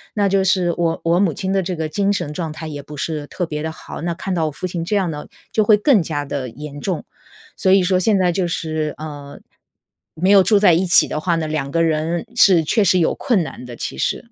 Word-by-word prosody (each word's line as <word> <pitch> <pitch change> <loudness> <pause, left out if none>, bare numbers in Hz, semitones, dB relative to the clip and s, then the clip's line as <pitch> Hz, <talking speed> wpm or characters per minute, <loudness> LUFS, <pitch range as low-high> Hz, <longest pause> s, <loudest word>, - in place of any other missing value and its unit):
那 205 -1 +2
就 195 0 +2
是 180 -2 +2
我 165 -1 0
我 170 +1 +2
母 185 -6 +1
亲 190 0 -2
的 195 - +2
这 180 0 -3
个 160 -1 -3
精 200 +5 0
神 150 -6 -2
状 165 -2 -4
态 160 +1 -7
也 145 -2 -6
不 150 +1 -11
是 150 -1 -3
特 180 - -3
别 150 -2 -5
地 160 0 -3
好， 155 - -9
那 170 0 -2
看 190 +1 -4
到 160 -3 0
我 155 - -3
父 185 - -6
亲 175 -2 -3
这 205 +5 -1
样 185 -5 +1
呢， 150 0 -7 0.2
就 215 - +2
会 210 0 +5
更 215 - +4
加 145 -2 -3
得 135 -3 -4
严 145 +3 -9
重。 185 -5 -3 0.5
所 190 - +1
以 195 -1 +5
说 185 0 +2
现 205 +1 +2
在 180 -2 +2
就 180 0 -1
是， 155 -3 -3
呃， 145 -2 -9 0.8
没 185 +5 +2
有 200 - +8
住 210 +3 +3
在 200 -4 +5
一 180 +3 +1
起 175 - +5
的 - - -3
话 170 +2 0
呢， 160 -1 -2
两 155 -3 -3
个 165 +3 +1
人 160 +1 -1
是 180 -5 +5
确 205 +7 +2
实 185 -1 +3
有 170 - +2
困 230 -11 0
难 155 - -8
的， 120 - -8
其 - - -6
实 - - -2
170 Hz, 275 characters per minute, -20 LUFS, 155-190 Hz, 0.8 s, 有